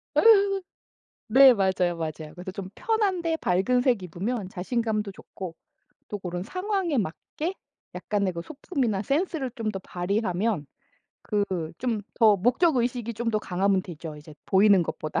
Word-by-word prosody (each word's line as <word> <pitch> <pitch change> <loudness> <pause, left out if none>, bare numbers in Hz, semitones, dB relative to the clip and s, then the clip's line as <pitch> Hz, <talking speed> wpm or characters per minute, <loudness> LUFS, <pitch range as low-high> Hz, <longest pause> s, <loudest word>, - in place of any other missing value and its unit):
예. - - +5 1.1
네 265 +2 +8
맞아요, 185 -3 +1
맞아요. 155 -1 -5
그래서 180 +1 -7
좀 190 0 -6
편한데 390 -8 0
밝은 220 - +2
색 245 -6 +2
입으면 190 +4 -3
자신감도 215 +1 -2
좋고 185 -3 -9 0.5
또 205 - -4
고런 180 -1 -4
상황에 365 - -1
맞게 245 - -3 0.4
약간의 200 -3 -1
뭐 170 - -4
소품이나 265 - -2
센스를 285 - -1
좀 220 -2 -2
더 195 - -5
발휘하면 185 -1 -1 0.7
그 205 -1 +3 0.3
좀 235 -4 -1
더 220 -3 +5
목적의식이 245 - +1
좀 230 +1 -1
더 215 - +1
강하면 190 0 +1
되죠. 160 -3 -8
이제 150 +1 -12
보이는 195 -1 +5
것보다. 155 -1 -3
210 Hz, 295 characters per minute, -26 LUFS, 180-250 Hz, 1.1 s, 네